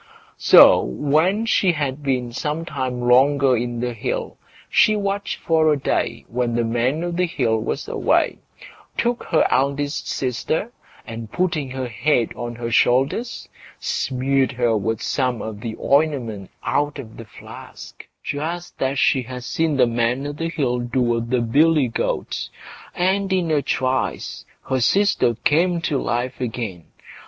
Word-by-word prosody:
So - - +8
when 165 +10 +1
she 190 -5 +3
had 145 -2 -3
been 130 -4 -1
some 150 +6 -3
time 130 -5 -3
longer 130 +2 +4
in 120 0 -3
the 125 0 -2
hill, 115 - -4 0.3
she 215 - +4
watched 200 -1 -2
for 160 -1 +3
a 150 - +2
day 140 - -2
when 120 -1 -1
the 120 - +1
Man 120 +7 0
o' 175 - -2
the 180 +1 0
Hill 115 -8 0
was - - -3
away, - - +1 0.6
took 240 0 0
her 160 - +2
eldest 140 +2 0
sister, 135 - -2 0.3
and 115 -1 -8
putting 170 -7 -1
her 130 0 -4
head 120 0 0
on 120 -1 -5
her 115 0 -5
shoulders, 135 - +1 0.3
smeared 135 +1 0
her 120 -2 +1
with 110 +2 -2
some 125 -4 0
of 110 -2 -6
the 110 -1 -5
ointment 135 -9 0
out 145 +2 0
of 115 -5 -9
the 115 - -9
flask, 110 - -12 0.2
just 170 +4 -5
as 135 +1 0
she 130 - +3
had 125 +1 -8
seen 160 +2 0
the 125 - +5
Man 120 +3 0
o' 145 - -3
the 165 +3 -3
Hill 130 -7 -1
do 120 +2 -2
with 115 -1 0
the 125 -1 +1
billy 145 +3 +3
goat, - - -3 0.5
and 190 +2 +1
in 180 -4 +1
a 150 -2 +2
trice 130 -1 -2 0.2
her 130 - 0
sister 195 - +2
came 170 +4 +3
to 150 -4 0
life 125 +2 -2
again. 110 -8 -4
130 Hz, 155 wpm, -21 LUFS, 120-155 Hz, 0.6 s, So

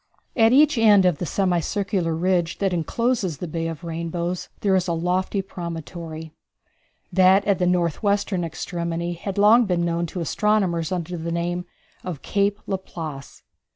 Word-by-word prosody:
At 225 -2 +5
each 290 0 +5
end 205 -4 +6
of 175 -5 +2
the 175 - -3
semi 185 -1 +1
circular 185 -2 -1
ridge 175 0 0
that 195 -2 0
encloses 190 - -1
the 175 - -5
Bay 165 +1 -3
of 165 0 -6
Rainbows 170 +1 -3
there 195 -2 +3
is 185 0 +1
a 170 - 0
lofty 180 +4 -1
promontory. 165 -3 -7 0.8
That 190 +2 +5
at 200 -2 +2
the 180 - +2
north 175 -3 +1
western 200 -3 0
extremity 170 +1 -3
had 190 +3 -6
long 220 +4 +6
been 175 -2 +1
known 170 0 -1
to 180 - -6
astronomers 180 -2 0
under 175 -1 -3
the 165 +1 -4
name 175 +1 -2 0.4
of 175 -6 -6
Cape 200 0 +1
Laplace. 160 -7 -6
180 Hz, 160 wpm, -23 LUFS, 170-195 Hz, 0.8 s, end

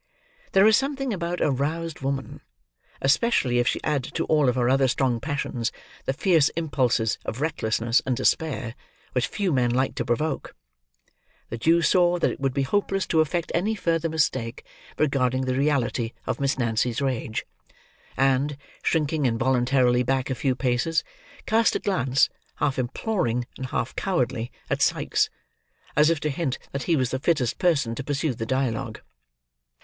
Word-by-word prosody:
There 195 +1 +6
is 220 0 +7
something 270 -2 -1
about 175 -1 -3
a 150 - +3
roused 155 +4 -2
woman: 135 0 -3 0.6
especially 135 - +3
if 120 - +1
she - - +1
add 150 -4 0
to 165 - +1
all 150 -5 +3
her 120 -1 0
other 135 +1 +4
strong 130 -2 +1
passions, 135 -4 -2 0.3
the 135 - 0
fierce 160 -1 +3
impulses 125 -8 +1
of 110 - -5
recklessness 115 -6 +1
and 130 -2 -1
despair; 135 -7 0 0.4
which 125 - 0
few 195 -5 -1
men 125 -2 +2
like 130 +2 +1
to - - -2
provoke. 140 +5 -2 1.0
The 115 - -4
Jew 165 +6 +3
saw 175 +2 +4
that 170 - +1
it - - -7
would 135 -2 -1
be 140 - +1
hopeless 195 +5 0
to 160 - +4
affect 170 +2 -1
any 205 +6 +1
further 165 -4 0
mistake 130 -6 -1 0.3
regarding 130 -3 +1
the 130 - 0
reality 130 -4 0
of - - -2
Miss 140 -1 0
Nancy's 120 -1 0
rage; 125 -5 -2 0.7
and, 135 +2 +2 0.2
shrinking 150 -3 +1
involuntarily 125 +1 +2
back 130 +1 0
a - - +2
few 130 +1 0
paces, 130 +6 0 0.4
cast 225 0 +3
a - - +1
glance, 135 -9 +2 0.3
half 140 -3 0
imploring 125 - -1
and 130 - -5
half 130 0 -3
cowardly, 125 - -1 0.2
at - - -1
Sikes: - - +2 0.7
as 150 +1 +5
if 165 -2 +1
to 150 - 0
hint 140 -2 -2
that 140 - -3
he 165 - +5
was 130 -4 0
the 130 - -1
fittest 135 -6 0
person 140 -10 +2
to 125 - -5
pursue 145 +1 -1
the 115 -1 -5
dialogue. 125 -3 -1
135 Hz, 165 wpm, -25 LUFS, 125-160 Hz, 1.0 s, is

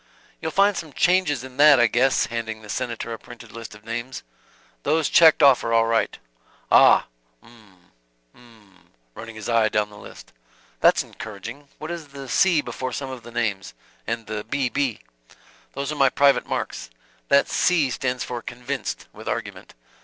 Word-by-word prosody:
"You'll 160 - -2
find 200 +3 +3
some 155 -5 -6
changes 175 -8 +2
in 130 -1 -11
that 145 -2 +7
I 120 - +6
guess," 125 +3 +2
handing 110 -1 -5
the 105 - -13
Senator 115 -1 -4
a 115 - -7
printed 120 -2 -13
list 115 -1 -9
of 105 0 -17
names. 120 +3 -5 0.6
"Those 155 +1 +1
checked 160 -2 +6
off 135 -3 +6
are 115 - -1
all 115 0 +4
right." 115 0 0 0.5
"Ah - - +6 0.4
'm 105 -7 -21 0.4
'm," 110 -6 -22 0.2
running 115 - -10
his 110 -2 -7
eye 115 -2 +3
down 105 0 -1
the 105 - -13
list. - - -13 0.5
"That's - - +4
encouraging. 110 +7 -9
What 155 +2 -7
is 170 -3 -6
the 140 -1 -10
'C' 170 +4 +3
before 130 -1 -5
some 135 0 -4
of 130 -2 -8
the 120 - -12
names, 105 - -3 0.3
and 115 0 -3
the 105 -1 -5
'B. 140 0 -1
B.'?" 130 -1 -1 0.7
"Those 140 +2 -4
are - - -4
my 135 - +6
private 140 +1 +3
marks. - - -4 0.4
That 140 0 +4
'C' 160 -7 +2
stands 125 0 -2
for 120 -1 -5
'convinced,' 125 +4 -5
with - - -12
argument. - - -6
120 Hz, 175 wpm, -23 LUFS, 115-140 Hz, 0.7 s, that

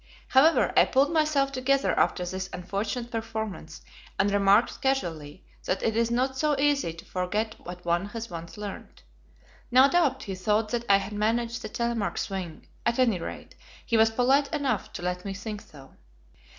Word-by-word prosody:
However, 300 +5 +4
I - - +7
pulled 275 +4 +2
myself 305 -3 +2
together 275 +1 +1
after 180 - +1
this 185 +1 -4
unfortunate 205 +7 -4
performance, 220 -7 -5 0.3
and 200 +1 +2
remarked 200 +3 +3
casually 170 - -2 0.2
that 185 - -1
it 225 - +1
is 230 0 +2
not 255 +3 0
so 295 +1 +1
easy 285 - +2
to 165 +1 -12
forget 210 +5 -2
what 180 0 -10
one 175 +3 +1
has 230 +2 -6
once 170 -1 -8
learnt. 205 - -8 0.7
No 260 +2 +7
doubt 280 -4 +2
he 195 - -5
thought 210 +4 0
that 235 +1 -2
I 200 - +7
had 200 +1 -5
managed 230 +3 0
the - - -6
"Telemark 235 -3 -2
swing"; 185 -5 -5 0.2
at 235 0 0
any 235 -8 +3
rate, - - -7 0.3
he 230 - 0
was 225 0 +5
polite 265 +5 +2
enough 275 -8 -1
to 175 - -7
let 180 0 -2
me 195 -1 -5
think 210 +1 -6
so. 135 -3 -15
220 Hz, 175 wpm, -27 LUFS, 190-255 Hz, 0.7 s, I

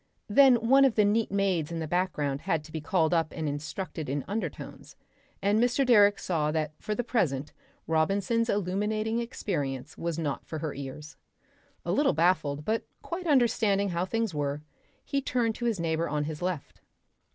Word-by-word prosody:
Then 265 +4 +7
one 270 +2 +6
of 265 -4 +4
the 210 - +4
neat 215 +1 +1
maids 190 -5 0
in 165 - -3
the 160 -1 -3
background 150 -5 -1
had 160 -2 -1
to 155 - -13
be 160 0 -4
called 160 +1 +1
up 165 -2 +1
and 160 -2 -2
instructed 150 +2 -4
in 140 0 -2
undertones, 215 +3 -5 0.5
and 205 +2 +3
Mr. 245 +3 +2
Direck 205 -5 +6
saw 155 -4 0
that 155 -1 -1
for 210 - -3
the 245 - -1
present 150 - -1 0.3
Robinson's 195 +8 +1
illuminating 210 +4 0
experience 145 - -4
was 170 -1 -2
not 150 -4 -2
for 160 - -6
her 155 -1 -3
ears. 140 +3 -8 0.7
A - - -1
little 290 - +3
baffled, 150 -3 +1
but 225 +1 0 0.2
quite 350 +1 -5
understanding 220 -8 +3
how 175 0 -1
things 225 0 -1
were, 145 0 -2 0.4
he 280 - -1
turned 240 -4 0
to 240 - -5
his 225 -5 0
neighbour 165 0 0
on 150 0 -1
his 150 +1 -5
left.... 180 -5 -4
180 Hz, 175 wpm, -28 LUFS, 155-220 Hz, 0.7 s, Then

